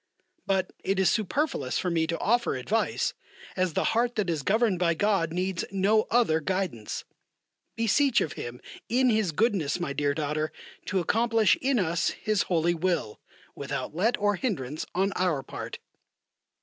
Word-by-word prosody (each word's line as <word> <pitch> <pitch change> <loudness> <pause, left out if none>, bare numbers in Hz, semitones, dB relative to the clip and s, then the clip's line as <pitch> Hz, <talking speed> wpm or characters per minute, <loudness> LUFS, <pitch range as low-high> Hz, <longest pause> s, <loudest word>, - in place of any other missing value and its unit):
But 190 -2 0
it 195 0 0
is 190 - +4
superfluous 215 - -1
for 180 - -1
me 165 -1 +1
to 165 +1 -1
offer 235 - +1
advice, 200 - 0 0.4
as 185 -3 0
the - - +1
heart 240 +1 +1
that 195 -5 0
is 155 -3 -1
governed 210 - +2
by 170 -2 +2
God 195 -3 +1
needs 180 +1 -1
no 200 +3 +2
other 225 -10 +3
guidance. 180 - -3 0.7
Beseech 235 +3 +3
of 155 - -2
Him 120 +1 -7 0.3
in 250 +1 +3
His 215 -5 +1
goodness, 185 -4 +1
my 155 -5 -2
dear 145 0 0
daughter, 155 0 -1 0.4
to 195 - +1
accomplish 225 +3 +3
in 270 -1 +2
us 170 -4 +1
His 215 -2 0
holy 170 -1 +2
will, 170 -10 -1 0.3
without - - -4
let 220 +8 +2
or 205 -1 +1
hindrance 155 - -3
on 195 +2 +2
our 170 -7 0
part. - - -7
185 Hz, 160 wpm, -27 LUFS, 160-220 Hz, 0.7 s, is